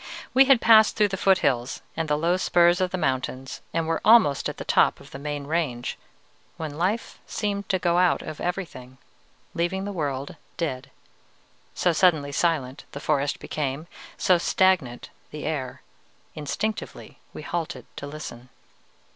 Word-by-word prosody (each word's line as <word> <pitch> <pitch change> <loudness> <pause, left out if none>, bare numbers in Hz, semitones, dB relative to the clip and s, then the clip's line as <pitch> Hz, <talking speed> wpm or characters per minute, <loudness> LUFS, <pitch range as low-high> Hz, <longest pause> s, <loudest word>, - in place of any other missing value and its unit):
"We 270 +1 +7
had 265 -3 +5
passed 220 -1 +6
through 210 -2 +3
the 195 - -2
foothills 140 -11 +1
and 160 -1 -2
the 150 - +2
low 170 +3 +2
spurs 175 0 +3
of 185 - +1
the 185 - -3
mountains, 130 -4 -2
and 165 -1 -1
were 165 0 -1
almost 215 -11 +5
at - - -7
the - - -7
top - - +3
of - - -15
the 135 - -8
main 145 0 -4
range, 145 -6 -2 0.6
when 155 -3 -5
life 190 +8 -2
seemed 200 -2 -3
to 190 - +2
go 175 -1 +1
out 180 -1 +3
of 155 -1 -7
everything, 160 -9 -5 0.6
leaving 180 +3 -1
the 205 - -4
world 145 -2 -3 0.2
dead, 135 -7 -3 0.9
so 175 - +2
suddenly 155 -5 +3
silent 140 -4 0
the 140 - -5
forest 145 -1 0
became, 145 +1 -3 0.3
so 180 -2 +3
stagnant 175 -10 +1 0.2
the 150 -1 -7
air. 140 -5 -4 0.5
Instinctively 195 +9 -4
we - - -9
halted 155 -8 -4
to 140 - -6
listen. 130 -5 -8
160 Hz, 155 wpm, -25 LUFS, 140-185 Hz, 0.9 s, We